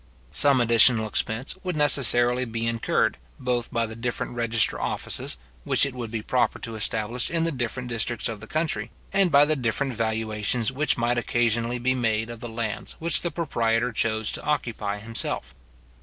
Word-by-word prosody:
Some 140 -3 +4
additional 115 -1 +5
expense 110 +4 -1
would 180 -2 -2
necessarily 130 -4 +4
be 115 -1 -3
incurred, 115 0 +1 0.2
both 125 -2 -1
by 115 -1 +1
the 110 0 -8
different 120 +1 -3
register 115 -2 +1
offices - - -2 0.3
which - - +3
it 140 - -4
would 120 -3 -5
be 110 -1 -4
proper 125 +2 +1
to 115 - -6
establish 110 +2 -1
in 165 0 0
the 165 - 0
different 125 -2 -3
districts 115 0 -1
of 110 -2 -5
the 110 - -10
country, 155 +4 -1 0.2
and 195 -3 +3
by 145 0 +7
the 155 +1 +1
different 130 +1 -1
valuations 110 +1 -1
which 145 +3 +1
might 120 +1 +1
occasionally 120 0 +1
be 125 +2 +1
made 115 -2 0
of 115 - -8
the 120 - -6
lands 115 -2 -4
which 170 +1 +1
the 170 - -1
proprietor 120 -8 0
chose 110 -1 +1
to - - -4
occupy 120 -8 -1
himself. 115 - -4
120 Hz, 175 wpm, -25 LUFS, 115-130 Hz, 0.3 s, by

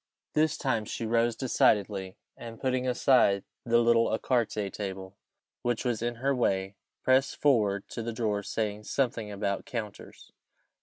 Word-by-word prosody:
This 155 0 +2
time 115 -6 -1
she 115 - -4
rose 115 +1 +2
decidedly, 100 -6 +1 0.2
and, 115 -1 -9
putting 130 -1 0
aside 125 -6 +3 0.2
the 120 -1 +3
little 115 0 +4
ecarté 110 -6 -1
table 95 -1 -6 0.5
which 120 +1 -1
was 120 -3 0
in 120 0 -1
her 135 +4 0
way, 95 -6 0 0.3
pressed 130 +1 +3
forward 105 -8 +2
to 115 - -5
the 115 +1 -3
drawer, 110 -3 -1
saying 105 0 -3
something 115 -5 -1
about 100 -1 -2
"counters." 115 -7 -7
115 Hz, 145 wpm, -29 LUFS, 105-125 Hz, 0.5 s, little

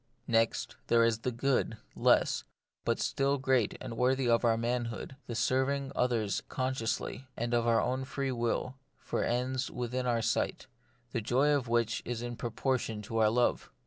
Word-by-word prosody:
Next, 115 0 +1
there 115 0 +5
is 115 -1 +2
the 125 - -2
good, 120 -2 0 0.2
less, - - +3 0.4
but - - +1
still 140 +1 +1
great 130 -5 +1
and 115 - -6
worthy 130 +2 +2
of 115 0 +3
our 115 -1 +3
manhood, 120 +1 -2
the 115 - -4
serving 130 +3 +1
others 115 -5 +1
consciously, 130 0 -2
and 120 +1 -2
of 120 0 +2
our 115 -1 +4
own 130 +1 -1
free 135 0 -2
will, 125 +2 -1 0.2
for - - -2
ends 125 +2 0
within 125 +1 -3
our 115 -2 +1
sight, 115 +3 0 0.5
the 115 - -1
joy 130 +7 +3
of 140 -4 +1
which 115 -1 +1
is 120 -1 -4
in 120 0 -4
proportion 115 -2 -2
to 115 +2 -2
our 110 -1 +5
love. 120 +2 +1
120 Hz, 170 wpm, -31 LUFS, 115-130 Hz, 0.5 s, there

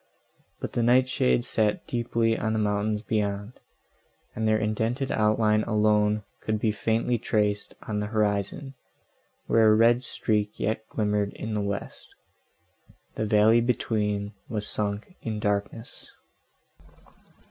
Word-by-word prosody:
But - - -5
the 120 - 0
night 125 +2 +4
shade 65 - +1
sat 105 -1 0
deeply 115 -1 0
on 110 -1 -1
the - - 0
mountains 105 0 0
beyond, 105 +1 -2 0.8
and 110 0 -1
their 110 0 +3
indented 110 +5 -1
outline 110 0 +2
alone 105 -1 +2 0.2
could 110 -1 -1
be 110 0 +1
faintly 110 +3 0
traced 105 -2 -1
on 105 -1 -3
the 105 - -2
horizon, 105 +5 -1 0.7
where 115 -1 +4
a - - +5
red 120 +3 +4
streak 105 -4 -1
yet 110 +1 -2
glimmered 105 -2 -1
in 110 0 -5
the 105 - 0
west. 100 0 -5 1.1
The 110 - -2
valley 110 +2 +5
between 105 -4 -1 0.2
was 105 -2 -3
sunk 105 - -3
in 110 -2 -3
darkness. 105 +2 -3
110 Hz, 130 wpm, -26 LUFS, 105-115 Hz, 1.1 s, a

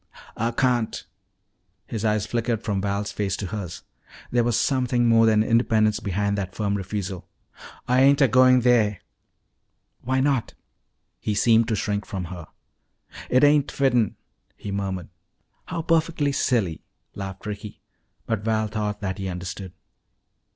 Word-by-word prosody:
"Ah 115 +1 0
can't!" 120 -2 0 0.8
His 110 -1 -5
eyes 105 -2 +1
flickered 115 -1 -1
from 100 -3 -1
Val's 100 +1 -2
face 100 -3 -2
to 100 - -4
hers. 95 -2 -6 0.5
There 120 -1 +3
was 120 -1 +1
something 125 -3 +1
more 115 0 +5
than 110 -1 +4
independence 110 -2 +2
behind 100 0 -1
that 95 -1 -5
firm 105 -2 -1
refusal. 95 -1 -4 0.6
"Ah 125 - +2
ain't 140 +2 +5
a 135 - +6
goin' 130 +1 +5
theah." 110 -5 +3 1.0
"Why 130 +1 0
not?" 135 -3 0 0.6
He 105 - -2
seemed 115 +2 +4
to 110 - 0
shrink 105 -1 -2
from 95 -2 -4
her. 85 -3 -9 0.8
"It 130 +2 +4
ain't 145 -1 +4
fitten," 125 -6 +1 0.4
he 100 - -6
murmured. 95 -3 -3 0.6
"How 165 - -4
perfectly 160 -3 +1
silly," 110 - 0 0.3
laughed 95 -1 -7
Ricky. 105 0 -6 0.5
But 110 - -1
Val 110 -1 0
thought 105 -1 -3
that 95 -2 -3
he 95 - -3
understood. 90 +1 -6
110 Hz, 145 wpm, -24 LUFS, 100-125 Hz, 1.0 s, a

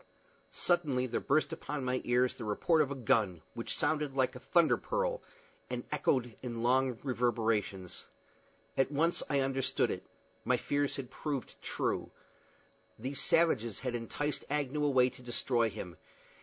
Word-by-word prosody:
Suddenly, 150 -8 +1
there 120 -2 -1
burst 150 +2 +1
upon 150 -4 -4
my 130 0 0
ears 125 +1 +2
the - - -7
report 155 +10 +2
of 145 - +1
a 140 - -3
gun, 110 -10 +1
which 115 - -3
sounded 150 -2 +1
like 130 -2 +2
a - - -7
thunder 170 +4 +4
peal, - - -1 0.5
and - - -3
echoed 120 -4 +1
in 120 -2 -4
long 130 0 +3
reverberations. 115 -7 0 0.7
At 135 +1 +2
once 165 +4 +2
I 140 -1 +2
understood 135 0 +1
it. - - -4 0.4
My - - +2
fears 145 0 0
had 130 -3 -6
proved 140 -5 -4
true. - - -1 0.9
These 130 +5 -2
savages 120 - +3
had 125 -2 -2
enticed 130 +5 -2
Agnew 150 0 0
away 130 -3 +4
to - - -15
destroy 120 -1 +1
him. 95 -4 -7
130 Hz, 150 wpm, -32 LUFS, 120-145 Hz, 0.9 s, thunder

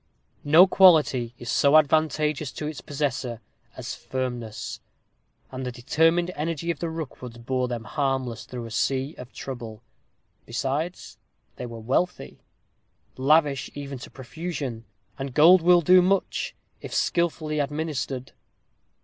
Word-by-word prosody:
No 160 +5 +7
quality 155 -11 +4
is 120 - -10
so 145 +2 +5
advantageous 155 -1 +1
to 150 - -5
its 150 -1 -5
possessor 135 -5 -3 0.4
as - - -5
firmness; 120 -4 -5 0.7
and 130 0 -5
the 125 - -3
determined 165 +8 +1
energy 165 +2 -2
of 165 - -6
the 170 - -2
Rookwoods 130 -7 -7
bore 125 +2 -1
them 120 -2 -4
harmless 130 -3 -2
through 125 -2 -7
a 115 - -9
sea 135 +5 -1
of 125 - -9
trouble. 115 -4 -8 0.6
Besides, 140 +9 -3 0.4
they 125 - -5
were 115 -1 -8
wealthy; 125 - -2 0.8
lavish 145 0 +2
even 140 -2 -6
to - - -10
profusion; 135 -4 -6 0.3
and 135 -1 -5
gold 170 +4 +7
will 175 +1 +5
do 180 +3 +6
much, 190 +1 0 0.3
if - - -8
skilfully 160 -3 0
administered. 145 -3 -3
140 Hz, 130 wpm, -25 LUFS, 125-160 Hz, 0.8 s, No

